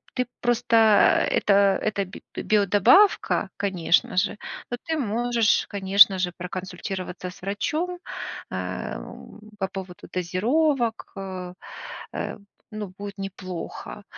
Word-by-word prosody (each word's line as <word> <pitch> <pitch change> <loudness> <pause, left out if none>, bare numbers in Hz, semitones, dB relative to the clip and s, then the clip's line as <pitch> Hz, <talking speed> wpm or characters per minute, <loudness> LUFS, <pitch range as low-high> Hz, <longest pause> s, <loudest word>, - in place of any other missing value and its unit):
ты 250 -2 0
просто, 240 -1 +1 0.5
э, - - 0
это 200 -1 +4
это 205 -2 -1
би 190 - -11
биодобавка, 210 - +4
конечно 185 -3 +1
же, 205 +2 +1 0.3
но 245 - -1
ты 320 -1 -1
можешь, 235 -2 +1
конечно 195 -1 +5
же, 180 -1 0
проконсультироваться 185 0 -5
с 180 - -14
врачом, 310 - -2 0.5
эм, - - -6 0.2
по 190 - 0
поводу 190 -2 -8
дозировок, 230 - 0
э, 185 -2 -6 0.6
э, - - -4 0.3
ну, 210 -3 -6
будет 200 0 -7
неплохо, 195 0 -7
200 Hz, 110 wpm, -25 LUFS, 185-230 Hz, 0.6 s, конечно